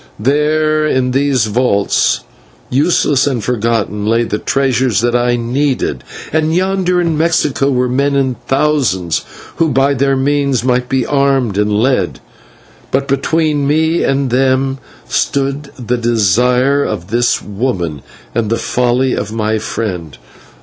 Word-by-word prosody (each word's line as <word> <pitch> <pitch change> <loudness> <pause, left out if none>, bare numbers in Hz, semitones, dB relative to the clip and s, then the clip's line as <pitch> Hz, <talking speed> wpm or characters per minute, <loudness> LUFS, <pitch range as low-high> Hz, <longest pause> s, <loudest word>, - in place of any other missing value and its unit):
There 155 +4 +1
in 130 -3 0
those 135 -3 +1
vaults, 105 -2 +1 0.5
useless 145 -1 +2
and 125 -6 -1
forgotten, 115 -3 -1
lay 115 +2 +2
the 105 -2 -3
treasures 130 -6 +1
that 120 0 +1
I 120 0 +2
needed, 130 +4 -1 0.3
and 160 +1 +1
yonder 185 -1 +1
in 170 -2 0
Mexico 150 -4 +1
were 125 -2 +1
men 140 +3 0
in 130 -2 0
thousands 135 - 0 0.3
who 165 -1 +2
by 135 +1 +2
their 135 +1 +1
means 140 -2 0
might 125 -1 0
be 130 -2 0
armed 135 -6 +1
and 105 +1 +1
led; 105 -3 0 0.7
but 135 +1 0
between 145 +1 0
me 160 +3 +1
and 135 -2 0
them 135 +1 +1 0.3
stood 140 +1 -1
the 125 -1 -2
desire 125 +5 +2
of 95 -3 -4
this 120 +1 +2
woman 95 - -3 0.3
and 115 -3 -1
the 115 - +1
folly 125 +2 0
of 105 +1 -3
my 110 0 -1
friend. 90 - -4
130 Hz, 135 wpm, -15 LUFS, 115-140 Hz, 0.7 s, useless